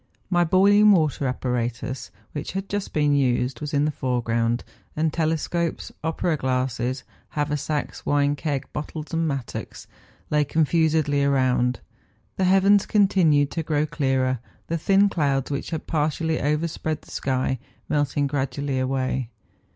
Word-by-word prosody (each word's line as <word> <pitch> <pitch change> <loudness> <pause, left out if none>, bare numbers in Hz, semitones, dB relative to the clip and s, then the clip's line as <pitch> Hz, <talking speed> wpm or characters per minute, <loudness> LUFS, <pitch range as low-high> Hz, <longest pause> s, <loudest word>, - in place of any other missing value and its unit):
My 175 -1 +4
boiling 205 +4 +5
water 155 -5 +1
apparatus, 125 0 -3 0.2
which 145 - -5
had 195 +1 -3
just 205 0 -3
been 150 -1 +2
used, 130 -1 +1
was 150 0 -4
in 145 -1 +2
the 155 - +1
foreground; 120 -3 0 0.3
and 155 0 0
telescopes, 165 +1 -1
opera 160 0 0
glasses, 130 -1 -1 0.3
haver¬ 150 0 0
sacks, 150 +1 -3
wine 145 0 +2
keg, 145 -3 -2
bottles, 155 +1 -6
and 165 0 +1
mattocks, 140 -5 -5 0.5
lay 150 0 +3
con¬ 155 +2 +1
fusedly 155 -3 +2
around. 130 -3 +2 0.6
The 190 - +2
heavens 195 +2 +4
continued 180 -9 +3
to 165 - -2
grow 150 -1 0
clearer, 130 -4 0 0.3
the 165 - -2
thin 195 +4 +4
clouds, 140 -7 0
which 140 - -3
had 160 -2 -4
partially 160 +1 0
over¬ 150 +3 +1
spread 155 -1 -4
the - - -16
sky, 130 -1 -1 0.3
melting 145 -1 +1
gradually 140 -1 -2
away. 130 -1 -1
145 Hz, 145 wpm, -24 LUFS, 130-160 Hz, 0.6 s, boiling